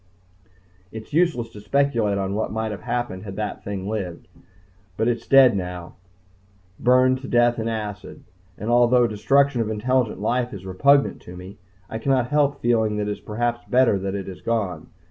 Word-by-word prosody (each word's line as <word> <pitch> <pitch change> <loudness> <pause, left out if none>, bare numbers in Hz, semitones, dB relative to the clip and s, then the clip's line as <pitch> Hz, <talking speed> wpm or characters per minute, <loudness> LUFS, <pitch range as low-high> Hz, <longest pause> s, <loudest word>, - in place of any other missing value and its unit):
It 110 0 -7
is - - -21
useless 155 -9 +1
to 105 - -11
speculate 115 -4 +1
on 95 0 -2
what 110 +2 -2
might 110 0 -2
have 105 - -7
happened 120 -7 -3
had 100 -3 -8
that 105 0 -4
thing 100 -1 -5
lived. 95 -6 -5 0.7
But 110 - +1
it's 120 -1 -2
dead 135 -4 +6
now 90 -2 -5 0.9
burned 130 +1 +3
to 135 - -7
death 120 0 +2
in 110 - -2
acid. 105 -4 -5 0.3
And 110 +3 -3
although 120 0 +4
destruction 135 +4 +2
of 110 - -2
intelligent 120 0 0
life 120 +2 -1
is 95 -1 -10
repugnant 140 +10 +2
to 90 0 -11
me, 95 +2 -11 0.3
I 110 - -5
cannot 130 -1 +1
help 145 -1 +2
feeling 110 -3 +2
that 105 0 -2
it - - -1
is - - -5
perhaps 120 +2 -3
better 125 -5 +3
that 95 +1 -3
it 100 -2 -5
is 95 -2 -9
gone. 110 -6 -2
110 Hz, 185 wpm, -23 LUFS, 100-125 Hz, 0.9 s, dead